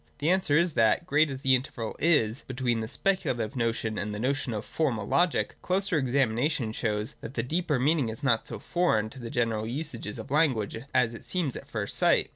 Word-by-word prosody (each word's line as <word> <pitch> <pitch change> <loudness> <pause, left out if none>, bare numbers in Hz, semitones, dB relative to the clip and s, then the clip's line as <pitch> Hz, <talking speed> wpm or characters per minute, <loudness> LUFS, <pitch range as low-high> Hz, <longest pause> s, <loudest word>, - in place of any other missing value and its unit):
The 155 +4 +1
answer 180 -6 +3
is 170 -1 +3
that, 115 +8 +3
great 155 -2 +3
as 135 -1 -6
the 135 -1 +4
interval 125 -3 -2
is 140 -8 +2
between 125 -3 -1
the 110 - -3
speculative 135 - -1
notion 115 -2 -1
and 105 0 -3
the - - -5
notion 135 +1 -1
of 105 -1 -4
Formal 125 -10 -1
Logic, 175 -1 +2
a - - -25
closer 185 -3 +1
examination 130 -1 +1
shows 105 -1 -2
that 120 - -8
the 115 - 0
deeper 155 +2 0
meaning 140 -1 +2
is 110 +6 -7
not 115 -5 +2
so 115 - -5
foreign 110 - 0
to 130 - -10
the 120 -2 -6
general 115 -4 0
usages 120 -5 -4
of 110 +3 -8
language 130 -9 +1
as 125 -3 +2
it 115 - -9
seems 170 -8 -1
at 140 - -9
first 110 -6 -2
sight. - - +3
125 Hz, 210 wpm, -28 LUFS, 110-150 Hz, -, the